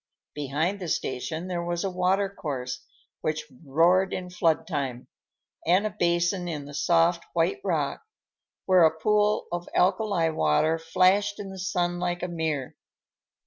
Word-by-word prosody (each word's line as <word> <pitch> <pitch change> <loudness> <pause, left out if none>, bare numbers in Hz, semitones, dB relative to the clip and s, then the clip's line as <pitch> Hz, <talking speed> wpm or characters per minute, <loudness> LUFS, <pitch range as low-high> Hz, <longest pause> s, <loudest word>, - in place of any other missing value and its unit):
Behind 150 +7 -1
the 180 - -5
station 160 +4 -3
there 175 -2 -2
was 175 0 -2
a 195 - -1
water 185 +2 +1
course, 135 -9 -5 0.4
which 155 0 -2 0.2
roared 170 +6 +3
in 180 -1 -5
flood 165 -3 +1
time, 130 -3 -3 0.6
and 185 +5 +4
a 215 - -1
basin 175 -1 0
in 150 -4 -4
the 145 - -10
soft 170 +2 +2
white 170 +1 +1
rock 155 -7 -1 0.6
where 185 -1 +5
a 160 0 +4
pool 210 +4 +2
of 175 0 -4
alkali 185 -2 +2
water 155 - +2
flashed 185 +5 +2
in 195 -1 -6
the 190 - -8
sun 175 -1 -1
like 175 0 -2
a - - 0
mirror. 160 -6 -3
175 Hz, 150 wpm, -26 LUFS, 155-185 Hz, 0.6 s, where